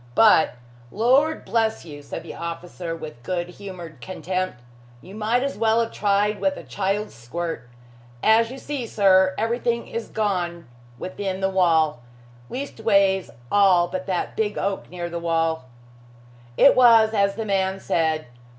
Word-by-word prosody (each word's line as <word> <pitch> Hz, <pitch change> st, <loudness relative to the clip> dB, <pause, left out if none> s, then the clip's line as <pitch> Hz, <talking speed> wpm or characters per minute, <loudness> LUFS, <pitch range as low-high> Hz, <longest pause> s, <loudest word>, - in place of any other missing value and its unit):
But, 210 Hz, -, +5 dB, 0.3 s
Lord 265 Hz, -, +2 dB
bless 220 Hz, 0 st, 0 dB
you!" 145 Hz, -3 st, -9 dB
said 140 Hz, -, -7 dB
the -, -, -8 dB
officer 170 Hz, 0 st, -6 dB
with 155 Hz, -7 st, -9 dB
good 175 Hz, +4 st, -3 dB
humored 175 Hz, -7 st, -10 dB
contempt, 185 Hz, -3 st, -3 dB, 0.4 s
"you 185 Hz, +9 st, -13 dB
might 220 Hz, +4 st, 0 dB
as 275 Hz, -6 st, -3 dB
well 225 Hz, 0 st, +3 dB
have 230 Hz, -1 st, 0 dB
tried 205 Hz, +1 st, +1 dB
with 285 Hz, -1 st, +1 dB
a -, -, -8 dB
child's 200 Hz, +2 st, -2 dB
squirt. 125 Hz, +2 st, -5 dB, 0.5 s
As 225 Hz, +1 st, +4 dB
you 260 Hz, -, -8 dB
see, 270 Hz, -3 st, -5 dB
sir, 190 Hz, -3 st, +4 dB
everything 235 Hz, +1 st, -1 dB
is 230 Hz, -1 st, -5 dB
gone 175 Hz, -, -2 dB, 0.3 s
within 190 Hz, +3 st, -4 dB
the 190 Hz, 0 st, 0 dB
wall. 160 Hz, -7 st, +3 dB, 0.5 s
Leastways, 200 Hz, -7 st, +1 dB, 0.2 s
all 190 Hz, -4 st, +5 dB
but 185 Hz, +1 st, -5 dB
that 185 Hz, -2 st, -2 dB
big 210 Hz, -2 st, -1 dB
oak 195 Hz, 0 st, -2 dB
near 175 Hz, -1 st, -5 dB
the 170 Hz, 0 st, -5 dB
wall." 165 Hz, -3 st, 0 dB, 0.9 s
It 280 Hz, -, +7 dB
was 230 Hz, -3 st, +6 dB
as 200 Hz, -2 st, +2 dB
the 225 Hz, +1 st, -4 dB
man 190 Hz, -1 st, 0 dB
said. 160 Hz, -3 st, 0 dB
195 Hz, 150 wpm, -23 LUFS, 170-220 Hz, 0.9 s, It